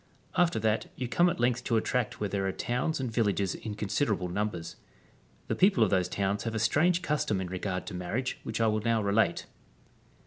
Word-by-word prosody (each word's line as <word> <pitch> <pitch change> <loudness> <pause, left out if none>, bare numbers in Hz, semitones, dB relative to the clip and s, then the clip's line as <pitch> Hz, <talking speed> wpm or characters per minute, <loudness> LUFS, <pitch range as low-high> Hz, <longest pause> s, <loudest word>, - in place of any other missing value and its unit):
After 175 -1 +3
that 110 0 0
you 125 - -3
come 175 +8 +3
at 170 - -3
length 120 0 +1
to 115 - +2
a - - +2
tract 125 -3 -1
where 105 - 0
there 95 0 -1
are - - 0
towns 125 +10 -1
and 130 -3 -2
villages 100 -4 +1
in 110 -2 -6
considerable 105 -3 -1
numbers.^ 90 -3 -3 0.7
The - - 0
people 185 - +4
of 105 - +1
those 95 -2 +2
towns 100 0 -1
have 115 -1 -3
a - - +1
strange 170 +10 +2
custom 145 - 0
in 95 -1 -4
regard 95 0 -3
to - - -7
marriage 100 +9 -3
which - - -4
I 115 - +3
will 110 -1 +1
now 115 -1 +1
relate. 100 -3 +2
110 Hz, 210 wpm, -29 LUFS, 100-125 Hz, 0.7 s, people